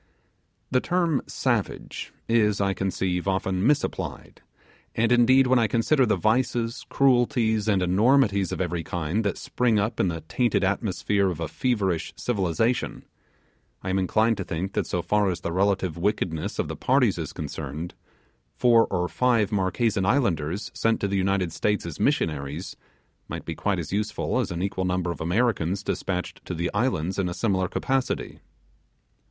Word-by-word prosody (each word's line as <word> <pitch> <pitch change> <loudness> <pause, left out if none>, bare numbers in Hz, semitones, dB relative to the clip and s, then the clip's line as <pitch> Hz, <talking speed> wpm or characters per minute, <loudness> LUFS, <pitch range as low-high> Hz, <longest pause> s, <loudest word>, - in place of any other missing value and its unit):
The 125 -1 +3
term 170 -5 +1
'Savage' - - -2 0.2
is, 105 -3 +2
I 100 -1 +1
conceive, 95 -1 -2
often 95 +1 0
misapplied, 150 0 -2 0.5
and 115 +1 +2
indeed, 125 +2 +5
when 130 0 +4
I 115 - +3
consider 125 +4 +2
the 105 - +3
vices, 115 +1 0
cruelties, 120 -5 +2
and 100 -3 +2
enormities 100 0 +3
of - - -3
every 85 -2 -2
kind 85 +6 -2
that 100 - -1
spring 120 -3 0
up 110 +3 -1
in - - +3
the 80 -2 -3
tainted 100 +10 0
atmosphere 100 0 +1
of 85 -3 -4
a 80 - -2
feverish 100 - -1
civilization, 115 +2 -1 0.8
I 95 - -2
am 95 - +1
inclined 110 +4 +2
to 95 - -3
think 90 +3 -4
that - - -1
so - - -2
far 105 -2 +2
as 90 -2 -3
the 85 - -3
relative 95 -2 0
wickedness 85 -5 -1
of - - -1
the - - -5
parties - - +2
is - - -4
concerned, 80 +3 -6 0.6
four 120 -2 +4
or 90 0 -1
five 115 -2 +1
Marquesan 100 +1 +1
Islanders 95 - 0
sent 115 0 +1
to 100 - +1
the 100 - -2
United 95 -3 0
States 105 +1 0
as 85 -4 -7
Missionaries 75 +2 -1 0.5
might - - -6
be - - -3
quite - - -1
as - - -5
useful 105 +4 -1
as 125 - -1
an 85 0 -3
equal 95 -1 -2
number 90 -1 0
of - - -7
Americans 95 0 0
despatched 90 -3 -3
to 90 - -4
the 85 +1 -2
Islands 100 -5 0
in 90 -2 0
a 85 - -5
similar 95 -5 +1
capacity. 135 +7 -2
100 Hz, 165 wpm, -25 LUFS, 90-115 Hz, 0.8 s, indeed